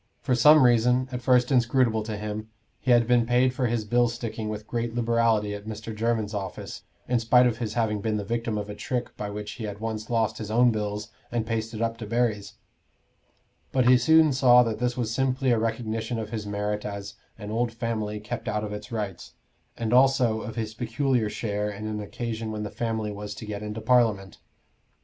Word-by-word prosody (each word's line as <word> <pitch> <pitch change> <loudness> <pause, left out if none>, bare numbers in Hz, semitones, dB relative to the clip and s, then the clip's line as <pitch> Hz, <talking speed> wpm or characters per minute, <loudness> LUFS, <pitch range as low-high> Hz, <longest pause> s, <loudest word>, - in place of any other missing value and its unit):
For 130 - -1
some 150 +4 +7
reason, 125 +1 +4
at 125 -1 -4
first 125 0 +3
inscrutable 120 -2 +3
to 110 -1 -4
him, 105 +1 -5 0.3
he - - -4
had 120 -1 +5
been 120 -1 +3
paid 125 +1 +3
for 130 -1 0
his 115 -2 -1
bill 120 +3 +3
sticking 115 -2 -4
with 105 0 -5
great 120 0 -3
liberality 115 -3 +2
at 105 +1 -8
Mr. 110 0 -6
Jermyn's 110 -1 -1
office, 100 -2 -5 0.3
in 125 -1 +2
spite 125 +2 +5
of 115 -2 0
his 110 -3 -3
having 110 -3 0
been 110 0 -1
the 105 - -3
victim 115 +1 -2
of 105 -1 -4
a 105 - -6
trick 125 +4 -4
by 105 - -5
which 105 0 -6
he 115 -2 -6
had 100 -1 -6
once 110 0 -4
lost 110 -2 0
his 110 -2 -5
own 120 +2 +4
bills 105 -1 -3 0.2
and 120 -2 -1
pasted 115 0 -2
up 115 0 -2
Debarry's; 110 -2 -1 1.2
but 130 -2 +2
he 130 - +8
soon 155 +4 +5
saw 125 -2 +6
that 110 -2 -3
this 125 0 -1
was 115 -2 -1
simply 130 0 +1
a 115 - +3
recognition 115 +1 -2
of 110 -1 -5
his 110 -3 -4
merit 105 +1 -2
as 100 -1 -6 0.2
"an 105 -1 -7
old 115 +1 0
family 115 -3 -3
kept 105 0 -6
out 105 0 -1
of 105 -1 -4
its 105 +1 -8
rights," 105 -6 -5 0.4
and 115 0 -1
also 125 -4 +4
of 110 - -7
his 110 -2 -3
peculiar 120 0 0
share 105 -1 -2
in 105 +1 -7
an 110 -1 -3
occasion 110 +1 -4
when 105 -1 -4
the 105 - -5
family 110 -2 -2
was 105 0 -6
to 110 - -8
get 105 -1 -5
into 105 +1 -5
Parliament. 110 -5 +2
115 Hz, 205 wpm, -26 LUFS, 105-120 Hz, 1.2 s, he